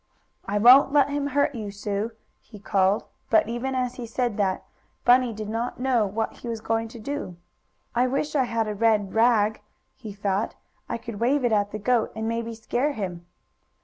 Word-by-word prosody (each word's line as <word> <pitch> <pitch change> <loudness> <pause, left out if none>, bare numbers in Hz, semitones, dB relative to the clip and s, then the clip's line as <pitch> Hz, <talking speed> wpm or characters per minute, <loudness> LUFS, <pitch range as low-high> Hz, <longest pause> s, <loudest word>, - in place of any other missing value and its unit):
"I 200 +1 0
won't 255 +6 +7
let 285 -1 +4
him 285 0 -1
hurt 285 +1 +1
you, 215 -4 -5
Sue!" 205 +2 -3 0.3
he 215 - -14
called, 195 0 +1 0.3
but, 220 - +4
even 240 +3 -3
as 250 -1 -2
he 240 -2 -6
said 240 -1 -1
that, 195 -3 0 0.4
Bunny 245 0 +5
did 215 -1 -6
not 230 +3 -3
know 250 -5 +2
what 220 +3 -3
he - - -9
was 230 -1 -3
going 225 +1 -1
to 235 +1 -11
do. 255 - -5 0.6
"I 245 +2 +2
wish 275 +4 -2
I 265 -3 +3
had 230 -2 -1
a 210 - -2
red 210 -2 +1
rag," 220 -2 +3 0.3
he 220 -5 -9
thought, 200 +1 -2 0.3
"I - - -2
could 230 -2 -8
wave 255 +3 +2
it 240 - +2
at 205 -1 +2
the 215 - -4
goat 230 +2 +1
and 220 0 -3
maybe 230 0 -3
scare 245 +6 -1
him." 180 -6 -5
230 Hz, 195 wpm, -25 LUFS, 210-250 Hz, 0.6 s, won't